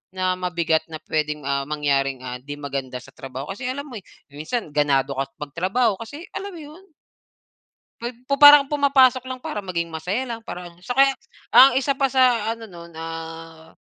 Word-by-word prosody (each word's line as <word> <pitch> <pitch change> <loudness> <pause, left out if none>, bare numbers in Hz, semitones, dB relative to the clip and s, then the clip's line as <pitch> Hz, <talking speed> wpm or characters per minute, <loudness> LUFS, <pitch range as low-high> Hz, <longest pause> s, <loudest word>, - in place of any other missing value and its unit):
na 185 0 +1
mabigat 170 -3 0
na 160 - -6
pwedeng, 150 -2 -2
ah, 140 0 0
mangyaring, 135 -3 0
ah, 125 0 -6
'di 145 +2 -8
maganda 135 -3 -5
sa 130 +2 -14
trabaho. 135 -2 -7
Kasi 250 +5 -5
alam 280 +2 -4
mo, 270 - -12
eh, - - -44 0.3
minsan 155 - -4
ganado 140 -2 +2
ka 135 0 -3
magtrabaho 185 - 0
kasi 285 +9 -8
alam 395 +1 -5
mo 365 - -10
'yon? 310 +4 -12 1.2
'Pag 240 +2 -4 0.2
pu 280 - +2
parang 290 -1 +9
pumapasok 270 -3 +4
lang 255 -1 -6
para 210 -4 -5
maging 170 -3 -2
masaya 180 +11 -3
lang, 230 -1 -5
parang 180 -5 -7 0.2
So 245 - -2
kaya 270 +1 +4 0.3
ang 270 - +8
isa 275 0 0
pa 270 -1 +1
sa 245 -4 +3
ano 225 -1 -9
nun, 170 -2 -12
ah, 165 0 -8
180 Hz, 180 wpm, -23 LUFS, -, 1.2 s, parang